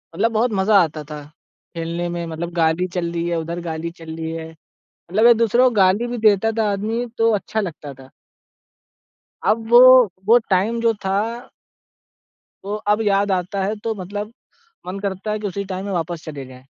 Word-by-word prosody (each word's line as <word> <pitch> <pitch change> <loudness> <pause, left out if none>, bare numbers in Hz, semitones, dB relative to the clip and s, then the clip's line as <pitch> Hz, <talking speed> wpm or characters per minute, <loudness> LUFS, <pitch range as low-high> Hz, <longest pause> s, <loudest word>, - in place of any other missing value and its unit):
मतलब 225 +6 +1
बहुत 225 +2 +1
मजा 200 +2 +2
आता 155 -2 -5
था, 150 0 -8 0.5
खेलने 170 +1 -3
में 170 0 -4
मतलब 165 +2 -5
गाली 165 +1 +1
चल 170 -2 -2
रही 170 0 -2
है, 170 - -1
उधर 170 +2 -5
गाली 165 0 -4
चल 165 -1 -10
रही 160 0 -5
है। 160 0 -6 0.4
मतलब 215 +7 0
एक-दूसरों 235 +1 +5
को 245 - -5
गाली 195 +4 +3
भी 240 0 -4
देता 215 0 +3
था 215 -2 +2
आदमी 220 +5 -2
तो 225 0 +3
अच्छा 220 +2 -2
लगता 155 -7 -6
था। 130 0 -15 1.4
अब 225 +1 +1
वो 240 +1 +8 0.5
वो 230 +4 +6
टाइम 200 +5 +1
जो 230 -1 +3
था 190 +1 +1 1.5
वो 205 +1 -3 0.2
अब 210 - -1
याद 200 -1 +1
आता 190 +2 -1
है 210 +3 -1
तो 225 -1 -1
मतलब 205 +3 -6 0.5
मन 190 +2 -5
करता 200 +1 -4
है, 215 - -2
कि 210 - -3
उसी 200 +1 -4
टाइम 190 0 -5
में 200 - -4
वापस 170 -1 -3
चले 145 -4 -7
जाएँ। 130 0 -14
190 Hz, 185 wpm, -20 LUFS, 170-215 Hz, 1.5 s, वो